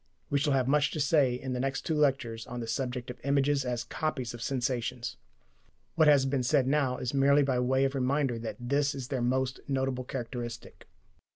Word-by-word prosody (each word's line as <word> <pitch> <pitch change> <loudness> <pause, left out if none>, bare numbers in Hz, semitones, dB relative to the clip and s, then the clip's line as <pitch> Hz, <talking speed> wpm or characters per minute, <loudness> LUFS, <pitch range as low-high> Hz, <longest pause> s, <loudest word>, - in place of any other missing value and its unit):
We 140 - +3
shall 145 0 +1
have 130 -2 +2
much 150 +1 +3
to 155 - -3
say 140 -3 +3
in 130 +1 -4
the 125 - -2
next 135 +1 -1
two 160 - 0
lectures 135 -7 0
on 120 0 -5
the 115 - -4
subject 125 0 -3
of - - -12
images 140 0 +2
as 125 -2 -2
copies 150 -7 -3
of 120 - -9
sensations. 125 -1 -2 0.8
What 160 -2 +4
has 140 -3 +6
been 135 -1 0
said 125 +1 +2
now 135 -2 +1
is 125 - -3
merely 140 +1 +4
by 130 -2 +1
way 130 +2 +2
of 135 - -1
reminder 135 -2 0
that 115 0 -5
this 140 +4 0
is 130 -3 -6
their 130 -3 -1
most 130 +2 0
notable 130 -2 -1
characteristic. 120 -2 -6
130 Hz, 200 wpm, -29 LUFS, 125-140 Hz, 0.8 s, has